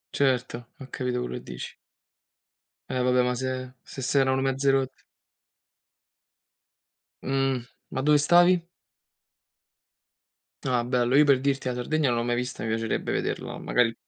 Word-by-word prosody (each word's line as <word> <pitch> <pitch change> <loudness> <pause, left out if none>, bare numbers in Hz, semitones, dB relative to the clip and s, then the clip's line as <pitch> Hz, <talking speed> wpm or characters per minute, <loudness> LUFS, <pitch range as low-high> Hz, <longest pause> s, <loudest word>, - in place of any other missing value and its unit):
Certo, 125 -3 0
ho 135 - -10
capito 125 -1 -2
quello 125 - -4
che - - -16
dici. 60 0 -8 1.1
Eh 130 -1 -1
vabbè, 125 0 +3
ma 125 0 +1
se 130 0 -4
se 135 - -9
s'erano 130 0 +2
mezze 135 +1 +2
rotti. 135 -1 -1 2.2
Mh, 135 -1 +1 0.3
ma 130 - -3
dove 150 +2 +5
stavi? 175 +3 +4 2.0
Ah, 125 -3 +1
bello. 125 0 +1
Io 150 +2 +7
per 135 -2 +4
dirti 135 -1 0
la 125 - 0
Sardegna 145 +4 0
non 120 -1 +1
l'ho - - -1
mai 120 0 0
vista 125 +1 -4
mi 110 - -2
piacerebbe 115 0 -1
vederla, - - -3
magari 115 -2 +1
130 Hz, 140 wpm, -26 LUFS, 125-135 Hz, 2.2 s, Io